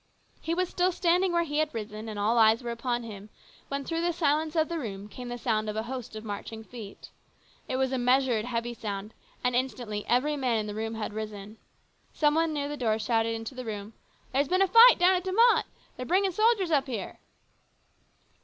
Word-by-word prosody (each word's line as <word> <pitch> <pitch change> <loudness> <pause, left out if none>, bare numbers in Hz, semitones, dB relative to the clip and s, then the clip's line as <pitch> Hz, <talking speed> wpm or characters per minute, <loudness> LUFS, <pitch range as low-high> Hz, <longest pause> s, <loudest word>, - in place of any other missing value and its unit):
He 330 - -1
was 365 +1 +1
still 360 +1 +1
standing 360 +1 +2
where 340 0 +2
he 295 -2 -2
had 310 0 +1
risen, 215 0 -6
and 215 - -6
all 220 +3 +2
eyes 225 +2 +5
were 240 - -3
upon 240 +1 -2
him, 210 -2 -9 0.4
when 280 0 -4
through 330 0 -2
the 345 +1 +1
silence 310 -1 0
of 315 -1 +2
the 340 -1 -3
room 205 -6 -6
came 245 +4 -9
the 245 - -4
sound 215 -3 -1
of 210 - -4
a 220 - -1
host 250 -1 -6
of 215 - -7
marching 220 +1 -6
feet. 220 -3 -11 0.6
It - - -1
was 265 0 +1
a 260 - -1
measured, 250 -3 +2
heavy 240 -1 -3
sound, 210 -1 -5 0.3
and 250 0 +1
instantly 245 -5 -2
every 280 +5 +2
man 255 -5 0
in 215 - -1
the 210 - -5
room 225 +1 -3
had 215 -1 -4
risen. 210 0 -7 0.6
Some 295 -1 +3
one 325 +1 +2
near 290 -2 -2
the 295 0 -5
door 225 -4 +1
shouted 225 +1 0
into 225 +4 -6
the 255 0 -6
room, 210 -1 -6 0.2
" - - -34
There's 275 +2 +2
been 370 +5 +3
a - - +2
fight 460 +6 +8
down 360 +1 +5
at 365 -1 0
De 375 0 -3
Mott! 465 +4 +5 0.3
They're 250 - -5
bringing 380 +2 +2
soldiers 430 -2 +2
up 280 -2 +2
here." 225 -7 -5
250 Hz, 220 wpm, -28 LUFS, 220-315 Hz, 0.6 s, fight